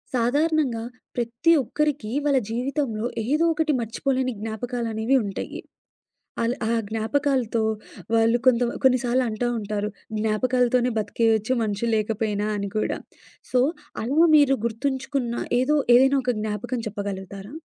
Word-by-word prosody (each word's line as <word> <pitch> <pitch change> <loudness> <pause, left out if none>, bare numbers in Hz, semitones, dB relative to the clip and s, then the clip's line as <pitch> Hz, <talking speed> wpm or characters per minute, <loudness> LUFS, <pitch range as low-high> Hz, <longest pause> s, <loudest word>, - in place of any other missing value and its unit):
సాధారణంగా, 275 0 +1 0.3
ప్రతీ 240 +7 +1
ఒక్కరికి 290 -3 -1 0.2
వాళ్ళ 280 -2 +3
జీవితంలో 245 -1 -2 0.2
ఏదో 305 +5 +2
ఒకటి 320 -1 +1
మర్చిపోలేని 255 +3 -1
జ్ఞాపకాలనేవి 225 +2 -2
ఉంటయి. 195 -1 -5 0.8
అల్ 230 +1 +1 0.2
ఆ - - +2 0.2
జ్ఞాపకాలతో 230 +1 0 0.5
వాళ్ళు 230 +1 +4
కొంత 250 -1 +5 0.2
కొన్ని 255 -1 +5
సార్లు 250 +1 +2
అంటా 225 +2 -1
ఉంటారు, 210 -1 -2 0.3
జ్ఞాపకాలతోనే 245 +3 +2
బతికేయచ్చు, 220 +2 +1
మనుషులు 220 +2 -1
లేకపోయినా, 215 -1 -1
అని 200 -1 -3
కూడా. 215 - 0 0.5
సో, 250 - +3 0.4
అలా 290 +9 +4
మీరు 280 -2 +5
గుర్తుంచుకున్న 265 +1 -2 0.3
ఏదో 295 +4 +2 0.2
ఏదైనా 270 +2 +5
ఒక 250 - +2
జ్ఞాపకం 220 +4 -3
చెప్పగలుగుతారా? 200 - -6
235 Hz, 115 wpm, -24 LUFS, 220-265 Hz, 0.8 s, కొంత